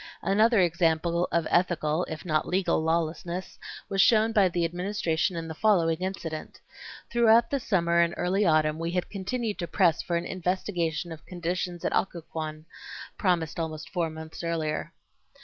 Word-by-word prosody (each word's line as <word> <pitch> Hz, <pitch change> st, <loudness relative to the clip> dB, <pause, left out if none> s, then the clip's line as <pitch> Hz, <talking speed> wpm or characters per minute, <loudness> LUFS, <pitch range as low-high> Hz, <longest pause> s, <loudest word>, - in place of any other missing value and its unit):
Another 220 Hz, +3 st, +4 dB
example 170 Hz, 0 st, +2 dB
of 170 Hz, -1 st, +1 dB
ethical, 175 Hz, -2 st, +1 dB
if 160 Hz, +2 st, -7 dB
not 155 Hz, -3 st, 0 dB
legal 180 Hz, -3 st, +1 dB
lawlessness, 170 Hz, +2 st, -2 dB, 0.3 s
was 195 Hz, -1 st, +2 dB
shown 220 Hz, +1 st, +4 dB
by 205 Hz, -4 st, +4 dB
the 175 Hz, -1 st, 0 dB
Administration 175 Hz, 0 st, -1 dB
in 165 Hz, -1 st, -4 dB
the 160 Hz, -, -5 dB
following 165 Hz, -4 st, +2 dB
incident. 175 Hz, -4 st, -5 dB, 0.5 s
Throughout 235 Hz, 0 st, +4 dB
the 280 Hz, -, +1 dB
summer 170 Hz, -7 st, +1 dB
and 170 Hz, 0 st, +2 dB
early 190 Hz, +3 st, +1 dB
autumn 155 Hz, -3 st, +2 dB
we 165 Hz, 0 st, -2 dB
had 180 Hz, +1 st, -2 dB
continued 210 Hz, +2 st, -3 dB
to 170 Hz, -, -3 dB
press 175 Hz, -4 st, +2 dB
for 175 Hz, -, -2 dB
an 170 Hz, -, -1 dB
investigation 180 Hz, -2 st, -2 dB
of 160 Hz, -2 st, -9 dB
conditions 175 Hz, 0 st, -3 dB
at -, -, 0 dB
Occoquan, 155 Hz, -3 st, -3 dB, 0.5 s
promised 175 Hz, -5 st, 0 dB
almost 155 Hz, -1 st, -5 dB
four 170 Hz, -3 st, 0 dB
months 160 Hz, +1 st, -9 dB
earlier. 160 Hz, -2 st, -2 dB
170 Hz, 155 wpm, -27 LUFS, 160-190 Hz, 0.5 s, Another